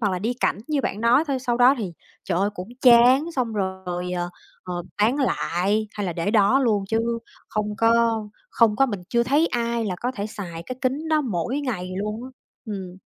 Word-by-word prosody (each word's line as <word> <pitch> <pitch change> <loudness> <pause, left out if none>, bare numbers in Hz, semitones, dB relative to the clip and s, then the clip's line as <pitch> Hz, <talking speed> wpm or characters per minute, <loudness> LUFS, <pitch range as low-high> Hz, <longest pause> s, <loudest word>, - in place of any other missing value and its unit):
hoặc 205 -4 +1
là 180 - -1
đi 230 +6 -1
cảnh - - +1
như 295 -3 +1
bạn 205 - -3
nói 245 +7 +4
thôi. 270 -2 0
Sau 245 -2 -1
đó 250 +3 +6
thì, 190 -6 -4 0.3
trời 175 -2 0
ơi, 200 +2 +1
cũng 180 +1 -7
chán 250 +3 +7
xong 240 -4 0
rồi, 190 -3 -3
ờ, 175 -1 -2 0.3
ờ, 180 -1 -4 0.2
bán 240 +6 +3
lại, 210 - 0
hay 205 -2 -3
là 175 - -2
để 170 +5 -1
đó 215 +4 +4
luôn, 210 -6 +2
chứ 225 - +1 0.5
không 210 0 -2
có 230 -1 +3 0.3
không 220 -3 +3
có, 270 - +4
mình 205 -7 -4
chưa 235 -1 +2
thấy 285 +7 +3
ai 235 -3 -1
là 185 -3 -2
có 250 +2 -1
thể 205 -3 -4
xài 175 -6 -7
cái 255 - -5
kính 275 +5 -1
đó 310 -1 +3
mỗi 240 - -2
ngày 190 -10 -3
luôn 210 +3 -3
á. 260 - -9 0.4
Ừm. 190 -4 -6
220 Hz, 215 wpm, -24 LUFS, 190-250 Hz, 0.5 s, chán